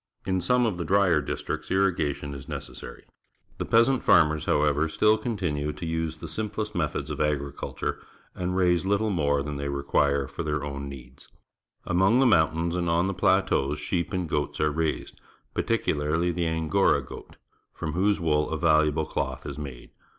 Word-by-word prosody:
In 95 -1 0
some 125 +7 +2
of 100 -6 -1
the - - -1
drier 90 -2 +3
districts 80 +3 -4
irriga 90 -7 +1
tion 70 -1 -7
is 70 -2 -9
necessary. - - -8 0.6
The - - -2
peasant 115 +3 +4
farmers, 75 -3 +4
however, 75 +1 +2
still 105 +6 +4
continue 90 -10 -2
to - - -7
use 80 -1 -2
the 85 - -8
simplest 105 +4 -4
methods 80 -7 -2
of - - -3
agriculture 70 -2 -2 0.3
and 90 0 -2
raise 90 -2 +3
little 100 +2 +1
more 70 -5 +1
than 75 0 -5
they 70 0 -3
require 70 0 +1
for 70 - -6
their 75 -1 -2
own 70 -1 -5
needs. 65 -2 -12 0.6
Among 95 +8 +3
the 135 - +4
mountains 85 -5 +3
and 85 -1 -1
on 85 +2 +2
the 95 - -1
plateaus 70 -5 +2
sheep 85 +4 -2
and 90 -3 -2
goats 75 -2 -2
are 75 0 +2
raised, 80 +1 -3 0.3
particularh^ 85 -5 0
the 85 -1 -1
Angora 80 -1 +2
goat, 60 - -11 0.4
from 80 - -5
whose 100 +4 +2
wool 75 -3 +1
a 80 - -2
valuable 80 -1 +3
cloth - - -3
is 70 +1 -6
made. 70 -4 -8
80 Hz, 170 wpm, -26 LUFS, 75-95 Hz, 0.6 s, peasant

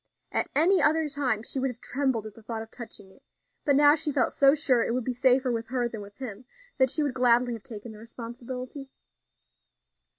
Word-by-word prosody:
At - - 0
any 355 +6 +4
other 315 0 +3
time 270 -7 -1
she 265 - -3
would 265 +1 0
have 245 -2 -8
trembled 260 -6 -1
at 215 - -8
the 225 - -15
thought 225 0 -5
of 225 - -15
touching 205 -5 -9
it; 265 - -22 0.4
but 285 - +4
now 290 +1 +7
she 310 -1 0
felt 265 -3 +1
so 275 +1 +5
sure 255 -6 +2
it 230 - -1
would 255 - -1
be 255 - -2
safer 255 +1 +3
with 230 -1 -3
her 250 -1 0
than 225 -3 -7
with 200 0 -12
him, 245 -3 -7 0.3
that 260 0 +4
she 305 - +1
would 285 -3 -1
gladly 245 -1 +3
have 225 - -7
taken 220 0 -9
the 215 - -12
responsibility. 250 +4 -8
250 Hz, 220 wpm, -27 LUFS, 230-275 Hz, 0.4 s, now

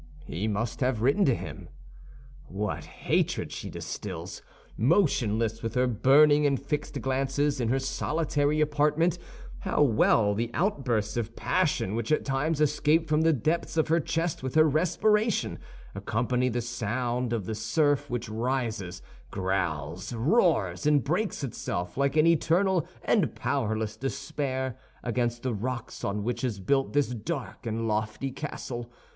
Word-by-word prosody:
He 100 - -3
must 110 +2 -2
have 125 -4 0
written 140 +10 +4
to 130 - +3
him. - - -8 0.8
What 100 +2 -3
hatred - - -1
she - - -6
distills! - - -6 0.3
Motionless, 115 - +2
with 115 +1 -4
her 125 0 +3
burning 145 +5 +5
and 140 -2 +1
fixed 145 +2 -3
glances, 135 +1 0
in 120 - 0
her 130 - +2
solitary 145 +2 0
apartment, 150 +3 +2 0.4
how 150 - +1
well 110 -4 +4
the 115 +3 -1
outbursts 130 - 0
of 115 -1 -3
passion 155 - 0
which 115 +4 -2
at 155 - +2
times 145 +3 0
escape 155 +2 +2
from 155 0 +2
the 165 0 +4
depths 160 +5 -1
of 160 - +2
her 165 +1 +4
chest 165 +2 -1
with 130 +1 -4
her 155 0 +6
respiration, 210 - +1 0.3
accompany 125 +2 0
the 120 0 -1
sound 120 +1 -2
of 115 -5 -1
the 110 - -3
surf 145 +6 +1
which 120 -1 -3
rises, 110 -5 -2 0.3
growls, 90 - -2
roars, 125 - +2
and 145 -3 +4
breaks 180 +2 -1
itself 90 -8 -4
like 140 +2 +1
an 155 - +6
eternal 170 +2 +3 0.2
and - - +2
powerless 110 -5 -1
despair 135 -1 -3 0.2
against 120 0 -1
the 130 -2 -1
rocks 120 +2 -4
on 100 +1 -1
which 120 +4 -2
is 115 -6 -1
built 135 +8 +1
this 145 -2 +2
dark 125 +2 -5
and 115 +1 -2
lofty 110 +4 -1
castle! 120 -4 -6
130 Hz, 145 wpm, -28 LUFS, 115-150 Hz, 0.8 s, her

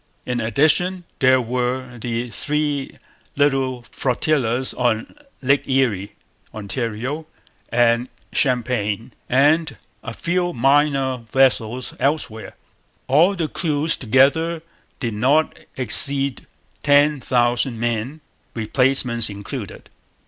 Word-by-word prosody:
In 125 -1 -2
addition, 160 +10 +2 0.2
there 130 0 +5
were 125 +1 -3
the 120 +1 -3
three 145 +3 -1 0.4
little 135 -3 +1
flotillas 130 -1 0
on 120 -3 -1 0.3
Lakes 140 +2 +2
Erie, 120 -8 0 0.4
Ontario, 115 +8 -4 0.4
and 120 +1 +2 0.2
Champlain; 120 -3 0 0.2
and 150 +5 +3 0.2
a 115 - -6
few 175 0 -1
minor 135 0 +2
vessels 130 -2 +1
elsewhere. 135 -6 -2 0.5
All 165 +9 +4
the 165 -4 -1
crews 155 -1 -1
together 140 +7 +2 0.4
did 115 -4 -2
not 135 +9 +2 0.2
exceed 135 +1 +2 0.3
ten 145 +1 +4
thousand 120 -1 +1
men, 120 +6 -2 0.3
replacements 120 0 +2
included. 100 0 -7
130 Hz, 95 wpm, -21 LUFS, 120-145 Hz, 0.5 s, there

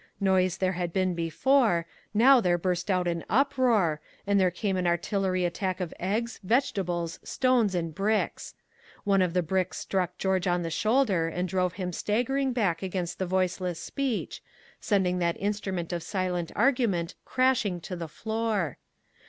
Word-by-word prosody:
Noise 185 -2 +2
there 185 -1 +1
had 175 -2 -3
been 185 0 +1
before; 175 - +2 0.3
now 245 +4 +6
there 175 -3 +2
burst 180 +2 -2
out 180 -2 +1
an 170 -1 -1
uproar, 230 - +2 0.2
and 200 0 +3
there 185 -1 +4
came 190 +2 -2
an 180 -1 0
artillery 185 +1 0
attack 185 +2 -2
of 180 -3 -4
eggs, 220 +6 -2
vegetables, 180 -7 0
stones 245 -7 +1
and 165 -2 -2
bricks. 205 +5 -1 0.5
One 195 -2 +3
of 180 -2 +1
the 180 - +3
bricks 185 +2 -1
struck 180 -2 -2
George 190 -1 0
on 175 0 +1
the 165 - -3
shoulder 215 -4 +2
and 180 +3 -2
drove 180 -1 0
him 180 -1 -4
staggering 255 +8 0
back 195 -9 0
against 180 -2 -3
the 185 - -1
Voiceless 185 -1 -1
Speech, 270 0 -3 0.4
sending 185 -4 +1
that 170 -1 0
instrument 190 -4 -2
of 170 - -2
silent 180 -1 -2
argument 210 -11 +1
crashing 255 -8 +1
to 180 +3 -6
the 170 -2 -5
floor. 220 -1 -2
185 Hz, 160 wpm, -28 LUFS, 175-210 Hz, 0.5 s, now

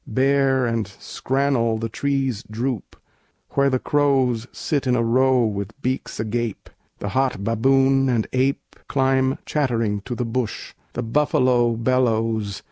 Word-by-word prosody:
Bare 135 +1 +2
and 115 -2 -1
scrannel 125 +2 -1
The 115 - -2
trees 135 -1 -1
droop, 120 +2 -3 0.6
where 140 0 +2
the 130 - +1
crows 130 -5 +1
sit 145 -4 -2
in 125 - +3
a 120 - +1
row 130 +1 +3
With 100 +3 -4
beaks 130 +1 -3
agape. 115 0 -3 0.3
The 100 - -4
hot 130 -2 0
baboon 135 +4 +3
and 115 -3 +1
ape 130 +2 -1
Climb 130 0 +1
chattering 115 -8 0
to 125 - -4
the 125 - -2
bush. 115 -1 -3 0.2
The 125 - -3
buffalo 120 -2 +2
Bellows. 115 -4 0
125 Hz, 135 wpm, -22 LUFS, 115-135 Hz, 0.6 s, in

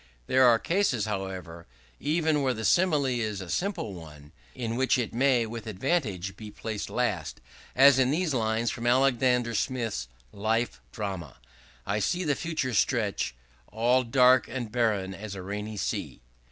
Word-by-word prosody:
There 130 - +5
are 115 -1 +6
cases, 165 - 0
however, 95 -5 -5 0.3
even 155 0 +1
where 130 -2 +1
the 110 0 -4
simile 155 - +3
is 115 -6 -1
a 95 -3 -6
simple 180 - -2
one, 75 -4 -12 0.2
in 115 -3 -3
which 130 +2 +2
it 120 -3 -2
may 125 -1 +3
with 115 0 -7
advantage 100 - -1
be 110 -1 -9
placed 105 0 -5
last, - - -2 0.4
as 135 0 +7
in 130 -1 +3
these 160 +1 0
lines 115 -1 0
from 120 0 -4
Alexander 125 -1 +3
Smith's 115 - -2 0.3
'Life 110 +3 -1
Drama': 95 - -5 0.5
"I 105 - 0
see 180 - 0
the 150 -4 +1
future 155 -5 -2
stretch 65 - 0 0.3
All 120 +4 +2
dark 125 +1 +4
and 120 -4 -5
barren 105 -5 0
as 100 +1 -7
a 95 - -7
rainy 105 +2 -5
sea." 80 - -4
115 Hz, 155 wpm, -28 LUFS, 105-130 Hz, 0.5 s, as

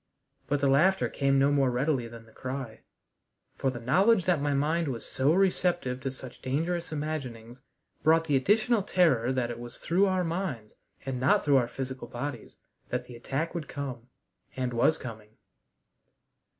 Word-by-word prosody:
But 145 +1 0
the 140 - +3
laughter 175 +8 +4
came 135 -1 +1
no 140 +1 +4
more 140 -2 +3
readily 125 0 0
than 115 -1 -11
the 110 - -19
cry, 130 -1 -6 0.8
for 135 - 0
the 125 -2 -5
knowledge 185 - +3
that 175 -6 +2
my 145 0 0
mind 155 +4 +1
was 120 -4 -4
so 135 +3 +1
receptive 175 -8 +1
to 135 - -2
such 130 -1 -10
dangerous 165 +6 -2
imaginings 130 -6 -5 0.4
brought 165 +1 +4
the 145 -3 +1
additional 215 - +3
terror 160 - +2
that 125 -2 -1
it 120 - -7
was 120 0 -8
through 190 +4 +2
our 185 -1 +1
minds 165 - -3 0.3
and 130 -2 -3
not 130 +2 +3
through 140 -2 +5
our 120 -2 +2
physical 130 -1 -6
bodies 120 0 -6 0.3
that 125 0 -2
the 125 - -11
attack 135 +7 -3
would 165 -5 -4
come, 130 -4 -6 0.5
and 125 -1 -1
was 135 +7 +3
coming. 110 -3 -10
135 Hz, 170 wpm, -28 LUFS, 125-165 Hz, 0.8 s, through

